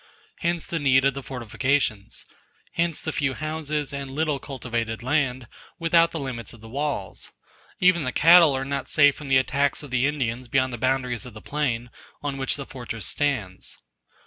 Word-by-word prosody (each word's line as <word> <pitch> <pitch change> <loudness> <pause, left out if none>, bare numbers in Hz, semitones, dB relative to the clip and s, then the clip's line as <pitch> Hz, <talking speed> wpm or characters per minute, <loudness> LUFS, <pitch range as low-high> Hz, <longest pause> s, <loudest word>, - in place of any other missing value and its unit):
Hence 170 -1 0
the 165 - -3
need 135 -2 +4
of 140 - +3
the 140 - -5
fortifications; 125 -3 -1 0.5
hence 170 -2 0
the 160 - -2
few 135 -3 0
houses 155 -2 -3
and 140 -1 -4
little 150 +1 -1
cultivated 120 -5 -4
land 130 -3 0 0.3
without 165 0 +4
the 165 - -5
limits 125 -5 -5
of 115 - -14
the 115 - -11
walls; 135 -7 -3 0.5
even 180 -3 +4
the 130 - -1
cattle 165 -2 +7
are 135 - -3
not 140 -1 -3
safe 145 -2 +5
from 150 - -9
the 135 -1 +5
attacks 140 +3 +1
of 145 - -10
the 130 +1 +2
Indians 130 -4 -2
beyond 130 0 +1
the 120 - -5
boundaries 130 -1 0
of 120 - -12
the - - -8
plain, 125 -4 -2 0.3
on 140 -1 -2
which 135 0 0
the 140 - -5
fortress 120 -4 -5
stands. 120 -11 -2
135 Hz, 180 wpm, -25 LUFS, 125-150 Hz, 0.5 s, cattle